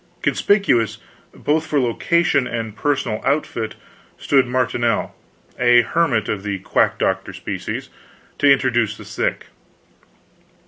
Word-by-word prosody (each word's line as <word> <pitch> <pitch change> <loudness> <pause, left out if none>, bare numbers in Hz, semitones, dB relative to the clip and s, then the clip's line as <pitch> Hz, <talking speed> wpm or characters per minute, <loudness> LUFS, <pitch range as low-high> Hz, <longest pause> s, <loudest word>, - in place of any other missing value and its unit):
Conspicuous, 195 - +2 0.3
both 155 +2 -1
for 150 - +1
location 140 +3 +1
and 115 -3 -4
personal 135 -6 -1
outfit, 135 -5 -1 0.4
stood 135 -3 +2
Marinel, 120 -2 0 0.5
a 120 -1 +6
hermit 130 -7 +1
of 105 - -2
the 100 -1 -3
quack 95 - +1
doctor - - -1
species, - - -5 0.5
to 145 -1 +5
introduce 120 -5 +2
the - - -11
sick. - - -3
125 Hz, 110 wpm, -20 LUFS, 115-145 Hz, 0.5 s, a